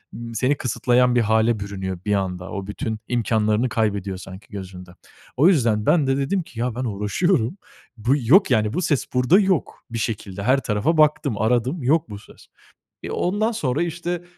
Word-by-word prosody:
ımm, 115 -1 -7
seni 130 +5 +1
kısıtlayan 125 0 +2
bir 120 - +4
hâle 110 +1 +2
bürünüyor 95 -2 -5
bir 105 - +1
anda. 95 -2 -2
O 100 -2 -5
bütün 110 +1 -4
imkânlarını 110 0 +1
kaybediyor 100 -4 -1
sanki 95 +1 -11
gözünde. 95 -3 -9 0.5
O 145 +6 +5
yüzden 115 - +2
ben 155 -6 +3
de 135 0 +1
dedim 140 +8 0
ki 125 - -12
ya, 120 -1 -1
ben 125 - -3
uğraşıyorum. 115 - 0 0.4
Bu 115 +4 +1
yok, 150 - +4
yani, 105 0 +2
bu 180 - -1
ses 145 -5 0
burda 125 +9 +4
yok. 190 -6 0
Bir 115 - -3
şekilde 100 -4 -4
her 130 +4 +3
tarafa 120 +10 0
baktım, 150 -5 +2
aradım. 125 - 0
Yok 155 +6 +2
bu 100 - -7
ses. - - -18 0.6
Eee, - - -6
ondan 210 +5 0
sonra 150 - -1
işte 175 +1 -3
120 Hz, 180 wpm, -22 LUFS, 105-150 Hz, 0.6 s, O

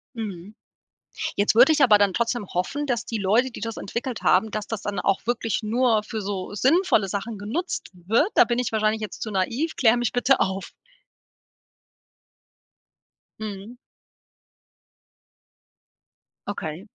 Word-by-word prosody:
Mhm. 205 -3 -7 0.8
Jetzt 205 +1 +2
würde 245 +6 +7
ich 305 -1 +2
aber 215 -5 +7
dann 200 -2 +2
trotzdem 235 0 -1
hoffen, 275 +12 -2
dass 240 -3 -1
die 230 - -3
Leute, 220 +6 +2
die - - -9
das 225 -1 -5
entwickelt 235 +4 -4
haben 220 - +3
dass 215 0 -4
das 225 -3 -4
dann 200 -2 -3
auch 195 0 0
wirklich 230 -1 -1
nur 225 0 +2
für 220 0 -5
so 195 -1 -4
sinnvolle 260 - +3
Sachen 205 +3 -4
genutzt 245 - -4
wird. 205 - +1
Da - - +8
bin 240 +1 -1
ich 250 - -1
wahrscheinlich 215 0 +1
jetzt 215 - -7
zu 215 - -4
naiv, 230 - -1
kläre 240 -1 +4
mich 240 -1 0
bitte 255 +2 +2
auf. 190 0 -2 2.7
Mhm. 215 +2 -7 2.7
Okay. 180 -2 -5
220 Hz, 140 wpm, -24 LUFS, 200-240 Hz, 2.7 s, Da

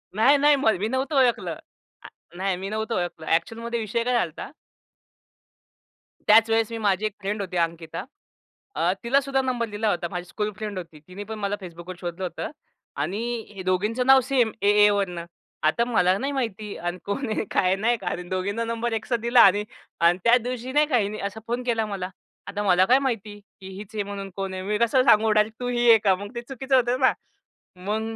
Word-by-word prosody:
नाही, 260 +7 +5
नाही. 290 +1 +5
मग 265 -6 +2
मी 210 - 0
नव्हतो 260 +5 -2
ओळखलं. 245 -3 +1 0.5
अ, - - -11 0.3
नाही 190 0 0
मी 190 +2 -5
नव्हतो 220 +2 -2
ओळखलं. 175 -3 -4
ॲक्चुअलमध्ये 230 +8 -1
विषय 230 +2 -1
काय 250 +1 0
झाला 240 - +3
होता? 165 +8 -9 1.8
त्याचवेळेस, 225 +1 +5
मी 230 - -4
माझी 205 -2 +1
एक 215 - -2
फ्रेंड 205 +1 -3
होती, 185 -2 -4
अंकिता. 165 -1 -2 0.7
अ, 165 +3 +2
तिलासुद्धा 270 +2 +2
नंबर 250 -3 -1
दिला 210 +1 -1
होता. 175 -3 -1
माझी 180 -1 -4
स्कूल 210 +4 -3
फ्रेंड 210 -2 -5
होती, 165 -4 -8
तिने 190 +3 -8
पण 220 +1 -7
मला 200 0 -1
Facebookवर 175 +1 -9
शोधलं 175 +1 -5
होतं. 175 -2 -4 0.5
आणि 185 +9 -2 0.3
हे 190 - -6
दोघींचं 210 +7 0
नाव 265 0 +8
सेम, 245 -4 +1
ए 200 - +3 0.2
एवरनं. 195 -5 0 0.4
आता 195 +10 +2
मला 185 -6 +2
नाही 275 +6 -2
माहिती 220 -6 -3
अन् 175 +1 -4
कोण 245 +7 -2
आहे? 215 - -1
काय - - +2
आहे? 185 +1 +3
नाही 230 +5 +1
का. - - -9
आणि 180 - -2
दोघींना 200 +4 -2
नंबर 230 0 -2
एकसाथ 225 +2 -1
दिला 235 +1 +5
आणि 205 +2 +6 0.4
अन् 170 +1 +4
त्याच 240 +1 +5
दिवशी 250 +1 -5
नाही 295 +2 +3
का 255 - +2
हिनी 210 -1 -1
असा 205 +3 -9
फोन 240 +2 -2
केला 230 -3 0
मला. 195 -3 -4 0.4
आता 205 0 -3
मला 185 -2 +4
काय 255 +5 +5
माहिती 220 -6 -3 0.2
की 190 - -9
हीच 210 +2 -10
आहे 210 - -1
म्हणून? 200 -1 -6
कोण 195 -1 -4
आहे? 185 0 -5
मी 210 +2 -1
कसं 235 +3 +3
सांगू 220 -3 +5
डायरेक्ट? 215 +1 +1
“तू 245 - -3
ही 240 -1 +2
आहे 225 - +9
का?” 195 -3 +4
मग 200 +2 -8
ते 235 - -3
चुकीचं 265 +2 -2
होतं 250 0 +2
ना. 260 - +5 0.7
मग 205 +4 -2
215 Hz, 205 wpm, -24 LUFS, 190-235 Hz, 1.8 s, आहे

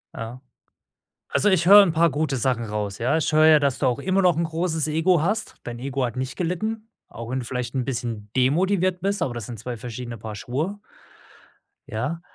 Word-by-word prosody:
Ja. 115 +3 -7 0.9
Also 210 - +2
ich 180 -4 +2
höre 205 +2 +10
'n 175 - 0
paar 165 +1 +3
gute 145 -1 -1
Sachen 125 -1 0
raus, 105 -2 -4
ja. 130 +6 +1
Ich 160 - -1
höre 155 0 +5
ja, 155 -1 +7
dass 140 -3 0
du 135 - +1
auch 125 0 +1
immer 190 +5 +1
noch 180 -4 +4
'n 170 - +1
großes 160 -1 -1
Ego 165 +2 +2
hast. 210 +7 -1
Dein 120 -1 -6
Ego 135 +1 -2
hat 120 0 -3
nicht 130 +1 -4
gelitten, 215 +6 -3 0.2
auch 115 0 -8
wenn 130 - -1
du - - -6
vielleicht 125 0 -4
'n 130 -2 0
bisschen 115 -5 -4
demotiviert 180 +7 +2
bist, 200 +2 -1
aber 125 - -1
das 115 -3 -5
sind 120 -2 -7
zwei 120 +3 -5
verschiedene 120 +1 -7
Paar 110 0 -7
Schuhe. 155 - -4 1.1
Ja. 130 +10 -3
140 Hz, 210 wpm, -24 LUFS, 120-170 Hz, 1.1 s, höre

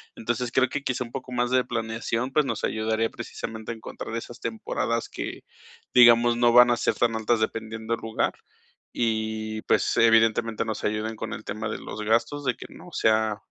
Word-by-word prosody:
Entonces 120 +1 -2
creo 130 +1 +3
que 145 -1 -3
quizá 130 -1 -1
un 120 - -11
poco 130 -1 -7
más 120 0 0
de 130 0 +4
planeación, 115 +1 -2
pues, 150 0 +3
nos - - -3
ayudaría 110 +1 0
precisamente 110 0 -6
a - - -5
encontrar 110 0 -7
esas 115 +1 -6
temporadas 115 +1 -2
que, - - -6 0.5
digamos, 120 -1 +7
no 120 0 +4
van 120 0 +8
a 120 - +2
ser - - 0
tan 115 -1 +1
altas 110 +1 +1
dependiendo 110 +1 -3
el - - -13
lugar 110 0 -1 0.6
y, 110 -1 -1
pues, - - +1
evidentemente 115 0 +3
nos 110 -2 -4
ayuden 110 +1 -1
con - - -5
el 110 - -7
tema 105 +1 -4
de - - -3
los 110 - -7
gastos, 115 +7 +1
de 125 - +1
que - - -10
no - - -13
sea 110 -1 +2
115 Hz, 190 wpm, -26 LUFS, 110-120 Hz, 0.6 s, van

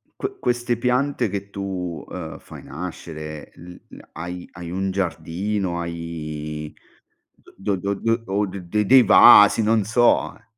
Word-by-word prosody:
que 395 0 -5
queste 120 -1 -1
piante 125 +3 0
che 100 0 -5
tu, 95 -4 -5
uhm, 85 -3 -7
fai - - -12
nascere, 75 -1 -8
il 90 +1 -13
l - - -13
hai 90 +1 -7
hai 85 0 -9
un 95 +2 -2
giardino, 90 +1 -2
hai 75 -3 -6 0.9
do 100 +1 -1
do 100 +2 -2
do 115 +3 0
o 100 +2 0
de 100 +2 -3
dei 130 +5 +7
vasi, 105 -1 +8
non 110 0 +2
so, 110 -7 +2
eh? - - -23
95 Hz, 140 wpm, -22 LUFS, 85-105 Hz, 0.9 s, vasi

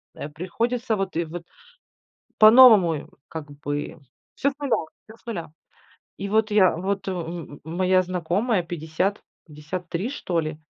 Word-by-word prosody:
э, 145 - -6
приходится, 225 +9 -2
вот 195 -1 -3
и 170 - 0
вот 170 +2 -7 1.0
по-новому, 215 -6 +8
и, 150 - -6 0.2
как 155 -2 -7
бы 145 +2 -5 0.4
всё 280 - +1
с 275 - -15
нуля, 280 -5 0 0.3
всё 220 +1 -14
с - - -32
нуля. 175 -9 -5 0.7
И 200 +1 -4
вот 220 +1 +2
я 195 -5 +4
вот, 190 +4 -3
м, 170 -4 -5
моя 185 +3 +2
знакомая 185 +3 0
50 170 +4 -2 0.2
53 170 - -5
что 180 -11 -2
ли, 155 -1 -4
180 Hz, 145 wpm, -24 LUFS, 160-215 Hz, 1.0 s, по-новому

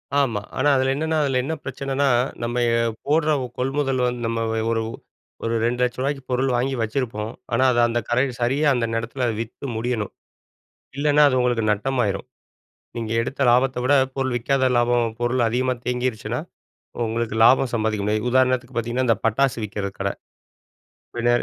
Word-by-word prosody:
ஆமா, 120 -8 +1 0.2
ஆனா 145 +3 +3
அதுல 130 0 +2
என்னன்னா, 160 +1 -1
அதுல 135 -2 +1
என்ன 160 +4 -2
பிரச்சனன்னா? 135 +1 -2 0.4
நம்ம 120 +1 -1
எ - - +3 0.3
போடுற 155 +2 +2
ஒ - - -4
கொள்முதல் 135 0 0 0.3
நம்ம 115 0 -1 0.3
ஒரு 115 -1 +1 0.6
ஒரு 115 0 0
200000 120 +1 0
ரூவாய்க்கு 135 +1 -1
பொருள் 130 +1 +1
வாங்கி 130 +2 0
வச்சிருப்போம். 110 -2 -2 0.2
ஆனா 130 +3 +3
அது 120 - +1
அந்த 120 0 0
கரை 125 +3 +3 0.2
சரியா 140 +5 +2
அந்த 120 -2 0
ந்த 115 - 0
எடத்ல 120 +3 -3
வித்து 115 +4 -6
முடியணும். 115 -3 -2 0.9
இல்லனா 150 +1 +3
அது 130 -1 +1
உங்களுக்கு 120 -3 +1
நட்டம் 130 +6 -1
ஆயிரும். 100 -1 -2 0.7
நீங்க 115 -1 -4
எடுத்த 135 +4 -4
லாபத்த 125 +1 +2
விட 140 +3 +3 0.2
பொருள் 130 -2 -1
விக்காத 130 +2 +1
லாபம், 120 0 +2 0.2
பொருள் 120 +1 +1
அதிகமா 125 +2 0
தேங்கீர்ச்சுன்னா, 125 -2 -2 0.6
உ - - -9
உங்களுக்கு 115 -1 -2
லாபம் 130 0 +5
சம்பாதிக்க 110 -2 0
முடியாது. 110 +2 0
உதாரணத்துக்கு 130 -1 +1
பாத்தீங்கன்னா, 120 +2 -1
இந்த 115 - +4
பட்டாசு 130 +4 +2
விக்கிற 100 -1 -4
கட. - - +1 1.1
வில 120 0 +1
125 Hz, 160 wpm, -23 LUFS, 115-135 Hz, 1.1 s, லாபம்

